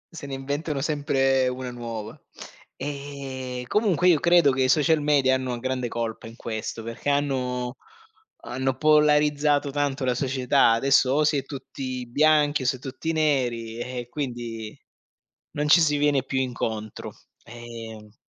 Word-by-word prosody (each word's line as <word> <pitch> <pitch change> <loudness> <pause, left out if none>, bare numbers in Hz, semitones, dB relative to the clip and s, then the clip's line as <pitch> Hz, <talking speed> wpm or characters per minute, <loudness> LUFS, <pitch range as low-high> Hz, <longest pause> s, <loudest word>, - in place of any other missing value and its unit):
Se 145 - -7
ne 135 - -4
inventano 140 +2 -3
sempre 135 -3 +1
una 125 0 -4
nuova. 115 -3 -6 0.6
Ehm, 135 -3 -6
comunque 185 - +2
io 160 - +5
credo 170 -4 +5
che 130 - -1
i 130 - +1
social 155 +2 +3
media 140 -3 +3
hanno 130 -2 -1
grande 130 -1 -2
colpa 115 -1 -4
in 115 - -11
questo, 115 0 -5
perché 115 +5 -4
hanno 130 -3 -1 0.7
hanno 130 +1 -2
polarizzato 150 -1 +3
tanto 145 -1 -1
la 125 - +2
società. 130 -2 +3
Adesso 135 +2 +3
o 150 +3 +3
si 150 -1 +2
è 135 - -2
tutti 130 -2 -6
bianchi, 150 +2 +3
o - - -5
si 130 - +2
è 130 - -12
tutti 135 +4 -4
neri 125 -7 0
eh, 125 -1 -5
quindi 120 -6 -5 0.8
non 150 0 -1
ci 170 +3 +7
si 150 -2 +3
viene 145 -2 +2
più 135 0 -2
incontro. 110 -4 -4 0.3
Ehm 115 -2 -10
135 Hz, 150 wpm, -25 LUFS, 125-145 Hz, 0.8 s, ci